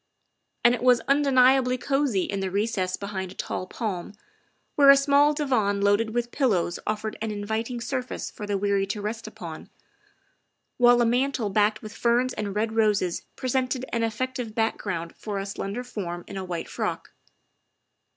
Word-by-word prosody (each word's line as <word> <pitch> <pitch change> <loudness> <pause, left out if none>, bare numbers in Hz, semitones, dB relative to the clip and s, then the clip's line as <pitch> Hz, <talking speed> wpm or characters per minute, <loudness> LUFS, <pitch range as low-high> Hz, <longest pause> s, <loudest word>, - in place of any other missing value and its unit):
' - - -50
' - - -51
And 240 - +7
it 245 - -3
was 250 -1 +5
undeniably 265 -2 +4
cosey 270 -7 +1
in 200 - -3
the 190 -1 -2
recess 195 -2 -1
behind 190 -2 -5
a - - -12
tall 185 - -4
palm, 195 -3 -4 0.6
where 280 -1 +6
a 275 - +10
small 285 +1 +4
divan 250 -10 +1
loaded 205 +2 +2
with 240 +1 -2
pillows 195 - +1
offered 215 0 -3
an 225 - -2
inviting 220 +4 -3
surface 255 +1 -4
for 210 - -7
the 205 -1 0
weary 200 0 +1
to 205 +2 -3
rest 220 +3 -4
upon, - - -9 1.1
while 245 -1 +6
a - - +2
mantel 245 -2 +1
banked 210 +2 +2
with 215 0 -8
ferns 245 +2 +2
and 205 -2 -4
red 220 +1 -1
roses 210 -5 +1
pre 255 - -4
sented 255 0 0
an 230 - +1
effective 230 0 -3
background 195 -7 -2
for 210 -2 -5
a 195 - -3
slender 200 +4 -4
form 175 -8 -5
in - - -8
a 190 - -3
white 175 -3 -4
frock. - - -4
220 Hz, 175 wpm, -26 LUFS, 200-250 Hz, 1.1 s, a